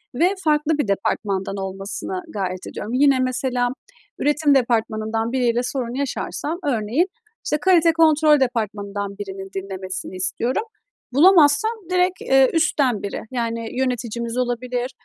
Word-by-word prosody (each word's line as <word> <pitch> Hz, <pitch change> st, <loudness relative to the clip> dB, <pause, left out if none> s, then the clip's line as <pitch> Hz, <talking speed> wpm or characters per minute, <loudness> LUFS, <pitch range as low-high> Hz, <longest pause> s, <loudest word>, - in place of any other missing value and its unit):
ve 360 Hz, +9 st, +2 dB
farklı 300 Hz, 0 st, +2 dB
bir 290 Hz, -8 st, 0 dB
departmandan 195 Hz, 0 st, -1 dB
olmasına 195 Hz, -, -5 dB
gayret 185 Hz, -, -4 dB
ediyorum. 225 Hz, +4 st, -6 dB
Yine, 275 Hz, 0 st, +4 dB
mesela, 255 Hz, -1 st, 0 dB, 0.5 s
üretim 295 Hz, -1 st, +3 dB
departmanından 225 Hz, -2 st, 0 dB
biriyle 245 Hz, -2 st, +1 dB
sorun 245 Hz, -2 st, -3 dB
yaşarsam 285 Hz, +4 st, -3 dB
örneğin, 255 Hz, -, +1 dB, 0.4 s
işte, 300 Hz, -, +1 dB
kalite 340 Hz, -3 st, +4 dB
kontrol 310 Hz, -2 st, +5 dB
departmanından 205 Hz, -5 st, -2 dB
birinin 195 Hz, -1 st, -7 dB
dinlemesini 190 Hz, -1 st, -5 dB
istiyorum. 235 Hz, -, -1 dB, 0.5 s
Bulamazsam, 320 Hz, -, +5 dB, 0.2 s
direkt, 365 Hz, 0 st, +1 dB
eee, 270 Hz, 0 st, +4 dB
üstten 280 Hz, -9 st, +1 dB
biri, 200 Hz, -, -4 dB
yani, 230 Hz, 0 st, -3 dB
yöneticimiz 235 Hz, -2 st, -2 dB
olabilir, 250 Hz, +1 st, -2 dB
245 Hz, 120 wpm, -22 LUFS, 210-290 Hz, 0.5 s, kontrol